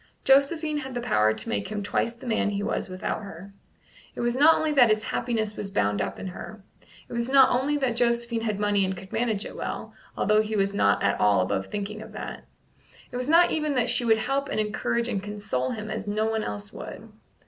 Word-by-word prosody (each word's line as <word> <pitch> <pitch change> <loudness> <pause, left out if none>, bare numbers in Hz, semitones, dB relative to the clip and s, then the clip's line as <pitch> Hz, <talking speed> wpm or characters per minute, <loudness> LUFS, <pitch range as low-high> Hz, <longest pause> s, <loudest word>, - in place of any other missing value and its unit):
Josephine 300 +3 +3
had 265 -3 -5
the - - -1
power 110 - +3
to 110 0 -4
make 100 -1 -2
him 210 -1 -4
twice 230 +3 -1
the 235 - -13
man 220 -3 +1
he 200 0 -2
was 200 - -2
without 185 +3 -3
her. 195 -1 -10 0.6
It - - -4
was 240 0 0
not 300 +5 +6
only 315 -1 0
that 260 -6 +6
his 215 0 +2
happiness 220 -3 -2
was 200 - -5
bound 105 - 0
up - - -3
in - - -7
her; 195 +3 -8 0.4
it - - -10
was 235 +1 -2
not 270 -1 +6
only 275 +4 +1
that 255 -5 0
Josephine 235 -1 +1
had 215 -3 -2
money 205 -1 +2
and 190 0 -2
could 190 +1 -11
manage 225 -3 0
it - - -8
well, - - -5 0.2
although 215 0 +3
he 215 0 -3
was 200 -1 +1
not 100 - +2
at - - +1
all 100 -2 +4
above 95 +1 -1
thinking 210 +1 -5
of - - -11
that; - - -7 0.7
it - - -8
was 250 +2 -3
not 340 +2 +6
even 305 -2 0
that 245 - +1
she - - +1
would 225 -2 +4
help 275 +5 -1
and - - -1
encourage 220 +2 -1
and 200 -5 -2
console 205 -11 -3
him 215 -1 -5
as - - -4
no 215 +1 0
one 220 -1 0
else 105 0 -6
would. - - -8
215 Hz, 230 wpm, -26 LUFS, 195-245 Hz, 0.7 s, not